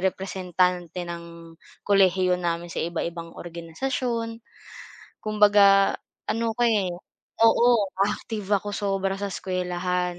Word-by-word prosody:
representante 180 -2 -1
ng 170 -1 -9 0.3
kolehiyo 185 -2 +3
namin 170 0 -2
sa - - -3
iba-ibang 170 0 -4
organisasyon. 230 +7 -4 0.8
Kumbaga 205 -2 +5 0.3
ano 230 0 0
ako, 240 - -1
eh 205 -5 +2 0.5
oo, 230 +1 +5 0.4
active 210 -2 -5
ako 205 - -8
sobra 195 -1 -1
sa 200 0 -4
eskuwelahan. 180 -1 -2
185 Hz, 100 wpm, -25 LUFS, 175-205 Hz, 0.8 s, Kumbaga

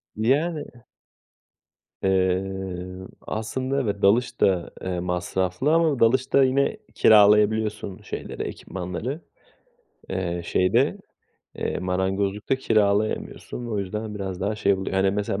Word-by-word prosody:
Yani 145 +8 +1 1.4
Eee, 95 -1 -1 0.2
aslında, 130 +5 -2
evet, 100 -4 -2
dalış 115 +6 +2
da, 90 -3 +2
eee, 90 -1 -3
masraflı 90 - -1
ama 160 -5 +3
dalışta 130 +4 +4
yine 140 +9 +2 0.2
kiralayabiliyorsun 105 -1 +4
şeyleri, - - -6
ekipmanları. 95 - -5 0.9
Eee, 85 -2 -2
şeyde, 120 - +2 0.6
eee, - - -2
marangozlukta 95 +5 -1
kiralayamıyorsun 110 +1 0
ve 120 - -6
o 105 - -1
yüzden 105 +2 -4
biraz 95 -2 -5
daha 100 +3 -1
şey 100 -1 +3
oluyor. 95 0 -3
Hani, 95 0 +3
mesela 100 0 -2
100 Hz, 110 wpm, -24 LUFS, 95-120 Hz, 1.4 s, dalışta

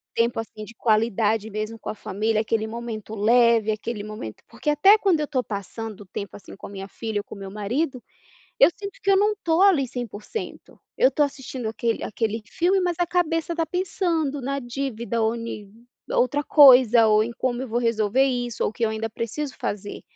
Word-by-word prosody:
Tempo 230 0 +1
assim 215 -1 -7
de 230 - -13
qualidade 220 -1 +1
mesmo 215 +2 -4
com - - -7
a - - -4
família 215 +2 -1
aquele 220 0 -1
momento 220 -2 -6
leve, 230 0 +4
aquele 215 0 -4
momento 215 - -8
porque 235 +6 -3
até 390 +9 +6
quando 380 -7 +2
eu 300 - -2
tô 260 -3 0
passando 210 +1 -6
o - - -11
tempo 195 0 -7
assim 200 - -12
com - - -10
a - - -12
minha 195 -1 -7
filha 220 -1 -4
ou - - -19
com - - -11
o - - -11
meu 195 -1 -8
marido, 245 +6 -2 0.6
eu 275 - +8
sinto 400 0 -8
que 395 - -1
eu 390 - +6
não 415 +2 +3
estou 340 -4 0
ali 345 -10 +5
100%. 240 - -7 0.2
Eu 260 - +5
tô 295 - -1
assistindo 270 -4 -4
aquele 225 +1 -2
aquele 220 +1 -2
filme, 370 +3 +2
mas 350 -2 -1
a 350 - +3
cabeça 340 -1 0
tá 330 -1 0
pensando 335 -5 -1
na 275 +2 -2
dívida 240 -2 -3
ou 220 +1 +1
ni 215 -3 -7 0.4
outra 290 +4 +1
coisa. 250 -6 +7
Ou 215 0 +4
em 235 - -4
como 250 -1 -1
eu 265 - -4
vou 235 +1 -1
resolver 230 +2 +2
isso 245 -3 -1
ou - - +1
o - - -24
que 235 - -4
eu 225 - +3
ainda 220 +1 -3
preciso 250 +6 -4
fazer. 205 0 -4
235 Hz, 210 wpm, -24 LUFS, 215-285 Hz, 0.6 s, eu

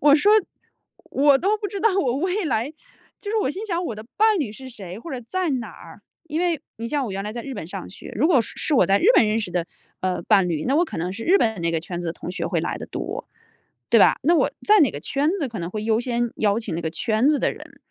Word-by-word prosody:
我 290 0 +6
说 405 +8 +4 0.8
我 280 0 +4
都 405 +6 +1
不 410 -1 -4
知 400 - -5
道 440 -3 +3
我 260 -9 +1
未 370 +6 -1
来 240 +2 0 0.5
就 410 - -5
是 445 - 0
我 - - 0
心 385 +8 -5
想 350 -3 -1
我 230 - -3
的 215 +1 -9
伴 435 -1 +4
侣 275 -9 -1
是 260 +5 -10
谁， 195 -5 -9
或 330 - -9
者 250 - -4
在 365 +9 -2
哪 245 -6 -2
儿。 165 +4 -14 0.3
因 310 +2 -1
为 345 -5 0 0.2
你 230 +1 -5
像 285 +1 0
我 205 - -4
原 195 +1 -3
来 210 - -4
在 235 0 -5
日 275 - -6
本 200 - -6
上 160 - -7
学。 - - -11
如 260 +9 +3
果 315 -7 +5
是 230 - -6
是 305 - 0
我 - - +5
在 195 +1 +4
日 - - -2
本 225 - +6
认 215 +1 +1
识 205 -5 -4
的 175 -1 -1 0.3
呃 185 -2 -1
伴 195 -3 +4
侣， 155 -3 -2
那 270 - +2
我 345 - +4
可 - - -7
能 175 +3 -2
是 225 +3 -6
日 380 +3 +5
本 220 - 0
那 170 0 +1
个 165 - 0
圈 175 +1 -5
子 175 - -5
的 165 - -1
同 175 - -7
学 185 - -3
会 - - 0
来 - - -3
得 - - -7
多， - - -5 0.6
对 - - +6
吧？ - - +5
那 335 +4 +4
我 - - +3 0.2
在 420 -2 +6
哪 285 - +5
个 145 - -6
圈 280 - 0
子 290 - -1
可 225 - -7
能 170 0 -4
会 215 +1 -4
优 225 0 +2
先 240 -1 -1
邀 210 0 +2
请 220 - -4
那 170 - -2
个 160 - -2
圈 220 - +1
子 300 -1 +3
的 - - +1
人。 - - -13
240 Hz, 310 characters per minute, -23 LUFS, 200-315 Hz, 0.8 s, 我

